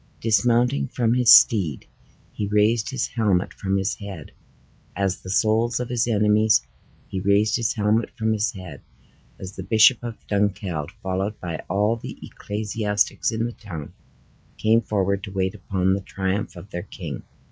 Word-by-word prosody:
Dismounting 115 - +2
from 115 -1 0
his 125 -1 +5
steed, 90 - +5 0.5
he 105 - -3
raised 105 +2 +2
his 130 -2 -1
helmet 100 -6 0
from 95 0 -1
his 95 +1 0
head, 95 -7 -9 0.6
as 95 0 -1
the 95 - -9
souls 110 +4 +2
of 125 - -4
his 120 -2 0
enemies, 105 -1 +3 0.4
he 95 - -4
raised 100 +3 +2
his 115 -3 0
helmet 105 +1 +1
from 110 0 +1
his 110 0 0
head, 95 -3 -10 0.6
as 95 0 -8
the - - -6
Bishop 110 +5 +5
of 120 -2 -8
Dunkeld, 100 -6 -1
followed 95 +3 -2
by 85 -3 -4
all 105 +5 +1
the - - -8
ecclesiastics 105 0 -1
in 115 +1 -1
the 120 - -3
town, 85 -11 -9 0.6
came 110 +1 +3
forward 100 -3 -1
to 100 - -9
wait 95 -1 -1
upon 95 -1 0
the 100 - -1
triumph 95 +1 -3
of 90 +3 -11
their 90 - -4
king. - - -7
105 Hz, 160 wpm, -23 LUFS, 95-110 Hz, 0.6 s, his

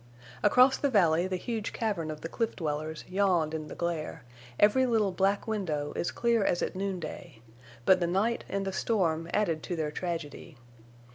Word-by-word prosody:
Across 250 +5 +5
the 285 - +1
valley 175 -6 +3
the 185 - -2
huge 220 +3 -3
cavern 200 -8 -2
of 155 -1 -6
the - - -4
cliff 225 +6 -2
dwellers 155 -1 -3
yawned 180 -5 +1
in 155 -1 -4
the - - -8
glare, 170 -6 -3 0.4
every 255 +5 +5
little 220 -5 +2
black 195 +4 +1
window 160 -9 -2
as 175 - -1
clear 235 -3 +1
as 175 - +1
at - - -3
noonday; 180 -7 -5 0.5
but 185 -1 +6
the 175 - +1
night 205 +7 0
and 195 0 -2
the 195 - -3
storm 170 -7 0
added 165 -7 +1
to 175 - -4
their 155 -2 -2
tragedy. 165 -2 -5
180 Hz, 180 wpm, -29 LUFS, 160-205 Hz, 0.5 s, but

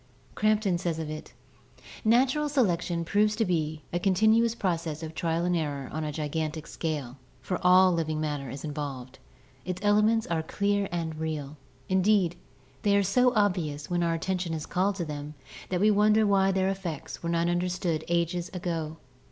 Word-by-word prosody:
Crampton 210 -4 +2
says 170 -3 -2
of 160 -1 -4
it: 155 - -7 0.7
"Natural 260 +6 +3
selection 175 - +1
proves 210 +4 +2
to 225 0 +1
be 155 -4 -1
a 175 - +1
continuous 220 +5 +3
process 165 -6 -2
of 160 0 -6
trial 165 +1 -1
and 180 0 +1
error 145 -5 -2
on 155 +1 -3
a 150 - -2
gigantic 155 +1 -3
scale, 145 -6 -4 0.2
for 180 - -3
all 185 +1 +6
of 170 - 0
living 155 -1 -1
matter 145 -3 -3
is 135 +3 -7
involved. 140 -4 -5 0.4
Its 185 0 -4
elements 210 +2 +4
are 165 -1 -1
clear 200 +4 0
and 165 -2 -3
real; 155 -2 -4 0.3
indeed, 190 -2 +3 0.5
they 200 0 +3
are 200 - +3
so 250 +6 +3
obvious 175 -8 0
when 175 0 +1
our 170 -1 +1
attention 180 0 -2
is 155 - -5
called 190 +2 0
to 175 -3 -3
them 150 0 -6 0.3
that 180 - 0
we 210 +3 +5
wonder 210 +1 +4
why 195 -1 +3
their 190 0 +1
effects 185 -6 -5
were 170 - -3
not 170 0 +1
understood 175 -2 -1
ages 170 +1 0
ago. 165 -3 -3
175 Hz, 175 wpm, -28 LUFS, 155-200 Hz, 0.7 s, all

